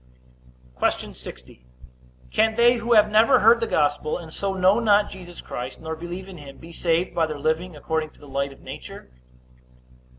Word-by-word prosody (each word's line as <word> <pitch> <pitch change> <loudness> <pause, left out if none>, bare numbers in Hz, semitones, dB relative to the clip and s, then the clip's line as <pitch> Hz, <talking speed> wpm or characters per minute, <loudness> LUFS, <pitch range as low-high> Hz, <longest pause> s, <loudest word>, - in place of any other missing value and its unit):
Q. - - -1
60. 60 - -12 0.7
Can 220 0 +2
they 240 +1 +5
who 235 +1 0
have 210 -1 +5
never 225 +5 +5
heard 225 +3 +6
the 230 - -1
gospel, 150 0 0
and 165 -2 -11
so 200 -1 -2
know 190 +4 +4
not 210 -3 +3
Jesus 175 -2 -10
Christ, 125 +1 -7
nor 160 0 -5
believe 175 +3 -7
in 185 -4 -11
him, 140 -2 -12
be 165 - -13
saved 170 +1 0
by 165 -2 +1
their 155 -1 -5
living 160 +4 -1
according 155 +1 -2
to - - -24
the 145 - -14
light 140 0 -2
of 135 - -16
nature? 65 - -10
175 Hz, 185 wpm, -23 LUFS, 155-210 Hz, 0.7 s, heard